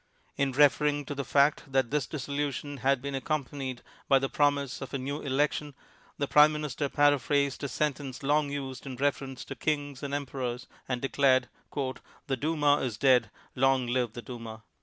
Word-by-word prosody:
In 140 -1 +1
referring 145 +1 +3
to 145 - -4
the 140 0 -3
fact 140 0 +2
that 130 -2 +1
this 145 -4 0
dissolution 145 -1 -3
had 135 0 +1
been 140 0 -3
accom 140 0 -1
panied 130 -3 -5 0.3
by 135 - +6
the 135 0 -1
promise 145 -2 +1
of 135 0 -5
a - - +1
new 140 +3 -4
election, 145 +1 0 0.4
the 140 - -1
Prime 150 +2 +6
IMinister 150 -1 -3
paraphrased 145 0 +2
a - - 0
sentence 140 -1 -2
long 145 +1 +2
used 135 -1 -5
in 130 - -5
reference 135 -1 -2
to - - -7
Kings 145 -3 -2
and 140 -1 -4
Emperors 130 -3 -4 0.2
and 125 -1 -2
declared, 135 -2 +3 0.8
"The 135 - 0
Duma 145 +1 +2
is 120 -6 -3
dead; 125 -6 +4 0.3
long 135 0 +3
live 120 -2 0
the 120 - -7
Duma." 115 -3 -8
140 Hz, 175 wpm, -29 LUFS, 130-145 Hz, 0.8 s, by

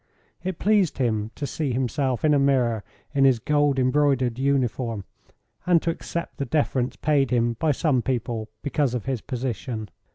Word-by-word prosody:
It 185 -1 -3
pleased 205 -5 +2
him 110 -5 0
to 145 - -4
see 140 -2 -2
himself 130 +1 0
in 150 - +4
a 145 - +4
mirror 125 -6 +2 0.3
in 140 -2 +3
his 135 -3 +5
gold 145 +3 +2
embroidered 130 -2 +2
uniform, 125 -6 0 0.6
and 175 -2 +5
to 170 - +1
accept 170 +1 -5
the 140 - -2
deference 130 -2 0
paid 145 -4 +2
him 120 -1 +2
by 160 - +2
some 140 -3 +1
people 120 -3 -2
because 140 -3 0
of 120 - -3
his 130 -4 -2
position. 115 -4 -4
130 Hz, 165 wpm, -24 LUFS, 120-145 Hz, 0.6 s, his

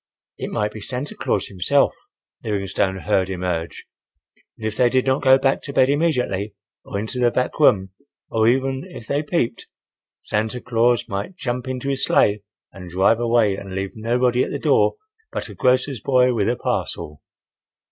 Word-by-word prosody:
It - - -4
might 105 0 -1
be 110 - -9
Santa 130 +6 -4
Claus 100 - -1
himself, 90 -3 +1 0.5
Livingstone 100 -2 -1
heard 95 -1 0
him 90 -1 -4
urge, 85 -2 -3 0.7
and 110 - -7
if 110 - -4
they 125 +1 +4
did 130 +1 +1
not 130 0 +1
go 130 -1 +6
back 135 0 +1
to 140 - -7
bed 130 0 +4
immediately, 125 - 0 0.3
or - - -5
into 110 +5 -4
the 120 -1 +4
back 125 +4 -2
room,—or 110 -1 +1
even 130 +2 +1
if 175 -11 -10
they 140 +5 0
peeped, 145 -7 -2 0.5
Santa 110 +3 -2
Claus 120 -1 +1
might 100 - -4
jump 125 -5 -3
into 130 +1 -4
his 135 -1 -1
sleigh 105 0 +3 0.3
and 90 -2 -10
drive 95 +6 +3
away 115 -4 +2
and 95 -1 -8
leave 95 0 -3
nobody 120 +3 +1
at - - -3
the - - -3
door - - +3 0.4
but - - -4
a - - -8
grocer's 130 -1 +1
boy 125 -2 +3
with 110 -2 +1
a 120 - +1
parcel. 75 -9 -3
120 Hz, 175 wpm, -22 LUFS, 100-130 Hz, 0.7 s, go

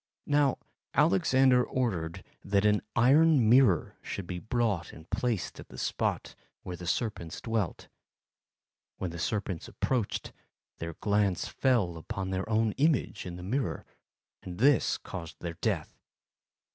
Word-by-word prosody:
Now, 145 -2 +3 0.4
Alexander 125 +6 +4
ordered 95 -10 -2 0.2
that 100 +1 +1
an 105 -2 +4
iron 135 +1 +5
mirror 120 -7 +4
should 100 - -5
be 90 0 -5
brought 110 -4 -1
and 80 +1 -13
placed 115 -8 -1
at - - -10
the - - -11
spot - - -2 0.3
where 90 - -5
the 90 0 -8
serpents 95 -5 -2
dwelt. 110 -6 -2 1.1
When 90 - -3
the 85 - -7
serpents 100 -3 -2
approached, 125 -6 -2 0.5
their 85 -1 -5
glance 100 -3 +1
fell 110 -11 +1
upon 95 +3 -4
their 95 +3 -2
own 110 0 +2
image 145 - +1
in 90 - -6
the 90 - -8
mirror, 125 +6 -2 0.6
and 90 -1 -8
this 135 +3 +4
caused 85 -3 -8
their 85 -1 -4
death. - - -2
105 Hz, 135 wpm, -29 LUFS, 90-125 Hz, 1.1 s, iron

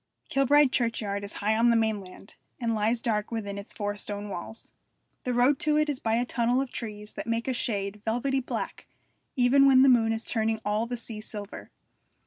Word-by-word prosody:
Kilbride 275 0 +4
churchyard 215 -5 -1
is 200 - -7
high 215 +2 0
on 230 +2 +4
the 235 - +4
mainland, 210 -3 -2 0.3
and 230 -2 0
lies 225 +2 0
dark 210 -3 0
within 205 -3 -4
its 200 - -9
four 205 0 -3
stone 205 0 -5
walls. 200 +4 -7 0.5
The 250 - 0
road 255 +3 +4
to 300 0 +2
it 305 0 +2
is 280 -3 -2
by 225 0 0
a 240 +1 +1
tunnel 240 +1 +1
of 270 -2 -2
trees 210 -2 -6
that - - -6
make 230 +1 -1
a 260 - +1
shade 205 -4 -2
velvety 245 +4 0
black 260 - -5 0.5
even 275 +2 +5
when 260 -1 +7
the 270 - +6
moon 230 -3 +4
is 225 0 -2
turning 220 -1 0
all 210 +2 0
the 245 0 -3
sea 225 -2 -5
silver. 205 -1 -8
230 Hz, 200 wpm, -27 LUFS, 210-250 Hz, 0.5 s, when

